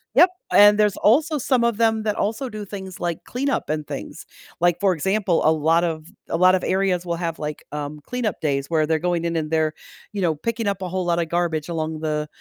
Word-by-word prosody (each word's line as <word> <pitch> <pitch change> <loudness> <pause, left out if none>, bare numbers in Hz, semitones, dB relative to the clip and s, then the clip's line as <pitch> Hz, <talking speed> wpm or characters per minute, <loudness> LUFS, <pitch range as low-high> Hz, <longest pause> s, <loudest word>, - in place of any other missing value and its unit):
Yep, 355 - +7 0.2
and 205 0 +7
there's 210 -2 +2
also 300 +8 +3
some 255 -2 +1
of 235 -3 +1
them 225 -1 +2
that 210 -1 0
also 230 +6 -1
do 215 -2 -7
things 190 -2 -8
like 170 -2 -3
cleanup 270 - -2
and 155 -1 -2
things. - - -7 0.3
Like, 175 0 +3
for 195 -2 +3
example, 190 +2 0
a 155 - +6
lot 160 +2 +2
of 160 -2 -3 0.2
a - - -1
lot 185 +2 +5
of 185 - +1
areas 185 -2 +1
will 170 -1 -1
have, 165 -1 -4
like, 150 -1 -5
um, 150 0 -5
cleanup 240 -3 -3
days 140 -2 -1
where 155 -2 +2
they're 160 0 +1
going 175 -1 -1
in 170 -1 -1
and 155 -1 -2
they're, 155 -1 +1 0.4
you 205 -2 -4
know, 165 -3 +1
picking 230 +6 -3
up 195 -1 -1
a 185 - -3
whole 185 0 -2
lotta 170 -1 +1
garbage 165 -1 -1
along 160 -1 -3
the 150 -1 -1
175 Hz, 225 wpm, -22 LUFS, 160-210 Hz, 0.4 s, Yep